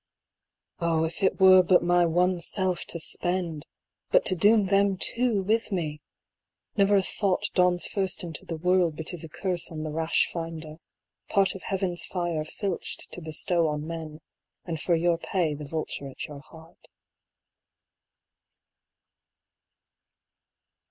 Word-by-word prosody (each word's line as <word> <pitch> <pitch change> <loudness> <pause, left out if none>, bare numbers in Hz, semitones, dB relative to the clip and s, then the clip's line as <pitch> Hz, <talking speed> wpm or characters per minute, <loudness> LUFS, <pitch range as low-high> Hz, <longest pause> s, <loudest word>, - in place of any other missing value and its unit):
Oh, 165 -2 +1
if 160 +4 -4
it 190 - +1
were 185 -1 +8
but 180 0 +4
my 175 0 +3
one 180 +2 +2
self 185 0 0
to 170 - -5
spend! 170 -2 -2 0.4
but - - +4
to - - +2
doom 205 +4 +4
them 195 0 +2
too 230 0 +2
with 220 +3 0
me! 155 -5 -3 0.7
Never 200 -1 +4
a 195 - +3
thought 195 -1 -1
dawns 180 -1 +3
first 190 -3 -1
into 165 -4 -6
the 165 - -5
world 180 -2 +2
but 160 +3 -4
is 170 - -6
a 165 - -8
curse 180 +2 -2
on 155 -1 -5
the 155 - -4
rash 160 +1 +1
finder; 165 -2 -6 0.5
part 195 -2 +3
of 195 - -9
heaven's 185 -3 -1
fire 175 -4 -2
filched 185 +3 -5
to 180 - -7
bestow 160 +1 0
on 150 0 -3
men, 160 -1 -7 0.4
and 160 -3 -4
for 175 - +2
your 170 0 +1
pay 170 -4 -1
the 150 0 -7
vulture 145 -2 -4
at 130 - -7
your 145 -2 -9
heart. 160 +2 -17
175 Hz, 145 wpm, -27 LUFS, 160-190 Hz, 0.7 s, were